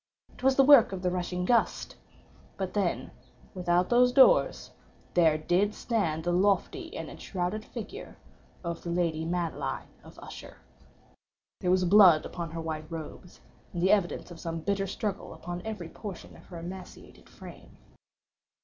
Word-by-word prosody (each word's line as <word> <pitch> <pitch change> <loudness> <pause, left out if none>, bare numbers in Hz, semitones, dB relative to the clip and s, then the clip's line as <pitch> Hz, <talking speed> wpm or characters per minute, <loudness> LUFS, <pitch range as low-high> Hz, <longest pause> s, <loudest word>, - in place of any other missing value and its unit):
It - - -16
was 265 +1 +3
the 270 - +6
work 275 -6 +7
of 185 -1 -5
the 180 - +1
rushing 180 0 -2
gust—but 195 -4 -3
then 195 -5 -1 0.4
without 180 -1 +1
those 245 +1 +5
doors 275 - +4 0.4
there 160 -3 +4
did 185 +7 +1
stand 170 -10 -1
the 175 - 0
lofty 205 - 0
and - - -5
enshrouded 190 +3 -4
figure 250 - -9 0.5
of 170 -1 -4
the 170 - -6
lady 165 -2 0
Madeline 165 -6 -3
of - - -15
Usher. - - -11 1.0
There 180 - -1
was 185 0 +3
blood 180 -4 +7
upon 170 -2 -5
her 165 +1 -5
white 155 0 -5
robes, 165 +2 -9 0.3
and 175 - -3
the 190 - +4
evidence 190 -3 0
of 170 - -10
some 165 -1 -4
bitter 195 +2 -1
struggle 200 +1 -4
upon 175 +1 -6
every 210 -7 -5
portion 200 -1 -9
of - - -17
her 175 - -9
emaciated 180 +2 -10
frame. - - -13
180 Hz, 150 wpm, -28 LUFS, 170-205 Hz, 1.0 s, work